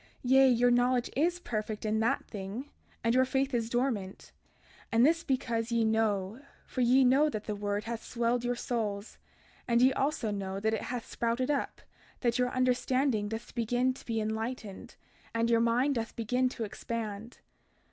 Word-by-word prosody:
Yea, 265 +1 +6
your 245 0 +4
knowledge 245 0 +2
is 345 +6 +1
perfect 215 -7 -4
in 215 0 +1
that 225 +1 +1
thing, 210 +7 -7 0.3
and 230 0 +2
your 255 +1 +5
faith 265 +1 0
is 230 -2 0
dormant; 235 -6 -2 0.6
and 230 +2 +5
this 330 +2 +3
because 235 -3 -1
ye 230 -1 +2
know, 220 0 0 0.2
for 255 - -3
ye 250 +2 +5
know 270 +4 +4
that 215 -6 -4
the 210 - -3
word 205 0 -2
hath 230 0 -5
swelled 240 0 0
your 245 0 0
souls, 215 -4 -3 0.5
and 235 -1 +3
ye 260 +2 +5
also 270 -5 -1
know 195 -1 -3
that 220 +2 0
it 220 - -1
hath 245 -2 -4
sprouted 240 +4 -1
up, 280 - -2 0.4
that 240 -1 +1
your 250 0 +2
understanding 255 -3 +1
doth 225 +2 -6
begin 245 +2 +1
to - - -13
be 225 -2 -2
enlightened, 220 -1 -4 0.4
and 230 +1 +1
your 230 0 +4
mind 245 +5 +2
doth 230 -3 -4
begin 250 +3 +1
to 235 - -5
expand. 220 0 -5
235 Hz, 175 wpm, -30 LUFS, 220-255 Hz, 0.6 s, Yea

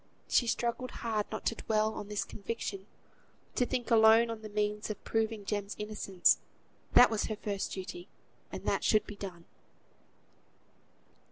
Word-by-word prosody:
She 240 - +3
struggled 240 +2 -1 0.2
hard 215 -2 0
not - - -5
to - - +2
dwell 215 -1 0
on 205 - -6
this 210 0 -1
conviction; 200 -2 -5 0.7
to 245 - +1
think 250 -2 -2
alone 225 +1 +6
on 225 -1 -6
the 215 - -7
means 210 +1 -1
of 215 - -5
proving 220 -2 -1
Jem's 205 0 -2
innocence; 210 -3 +2 0.5
that 245 - +8
was 220 - 0
her 215 - -3
first 205 -2 -3
duty, 185 -1 -7 0.4
and - - -6
that - - +1
should 215 -1 +3
be 210 - -8
done. 180 -4 -8
215 Hz, 155 wpm, -31 LUFS, 205-225 Hz, 0.7 s, that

